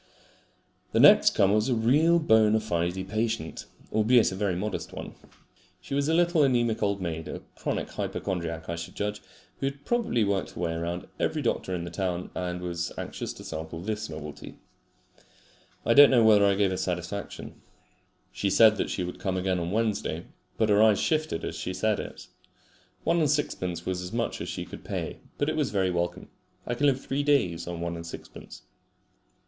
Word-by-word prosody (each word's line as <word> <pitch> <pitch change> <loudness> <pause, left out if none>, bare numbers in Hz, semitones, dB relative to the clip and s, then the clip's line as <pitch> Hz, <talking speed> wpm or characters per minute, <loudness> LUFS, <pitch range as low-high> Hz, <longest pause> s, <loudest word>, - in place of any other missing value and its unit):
The - - +3
next - - +7
comer 100 0 +4
was 105 +4 +2
a 125 - +2
real 145 +10 +4
bona 110 -8 +4
fide 90 -2 -2
patient, 110 -4 -2 0.3
albeit 110 +1 +4
a - - -4
very 95 -2 0
modest 105 +4 -3
one. - - -7 0.7
She - - -8
was 140 +2 +1
a - - +3
little 175 -1 +3
anaemic 120 -4 +2
old 100 -1 0
maid, 80 -2 -4
a - - -6
chronic - - -2
hypochondriac 85 -4 -3
I 85 - -3
should 85 - -7
judge, 105 0 -3 0.4
who 135 - 0
had 140 +1 -6
probably 235 - +1
worked 100 -2 -1
her - - -9
way 85 -1 -1
round 85 +2 -3
every - - 0
doctor 95 - -1
in 85 - -3
the 85 - -6
town, 90 -1 -3
and 90 -1 -3
was 85 -1 -3
anxious - - -5
to - - -11
sample 80 +1 -6
this 105 +2 -4
novelty. 75 -2 -8 1.3
I 115 - +4
don't 145 +2 +9
know 120 -3 +5
whether 105 -2 +6
I 100 - +3
gave 100 -1 +2
her 95 - -2
satisfaction. 90 +3 -4 0.7
She 100 - -1
said 110 +1 +6
that - - -1
she 90 - -2
would 90 - -6
come 95 -1 -1
again 95 0 0
on 85 0 -3
Wednesday, 105 -5 -1 0.3
but 110 -1 +2
her 105 0 +5
eyes 110 -2 +5
shifted 155 - 0
as - - -4
she 90 - -4
said 105 +2 +1
it. - - -7 0.8
One 170 - +2
and 155 -3 +2
sixpence 95 - -1
was 90 -1 -2
as 90 - -6
much - - -2
as - - -4
she - - -4
could - - -10
pay, - - -4 0.2
but 145 - 0
it 155 - 0
was 150 -4 0
very 95 -3 +1
welcome. 85 0 -2 0.4
I 120 - -2
can 145 +4 +2
live 135 -2 +2
three 140 +2 -1
days 135 - +1
on 85 -1 -5
one 85 0 -3
and 85 0 -7
sixpence. 85 - -10
100 Hz, 195 wpm, -27 LUFS, 90-115 Hz, 1.3 s, don't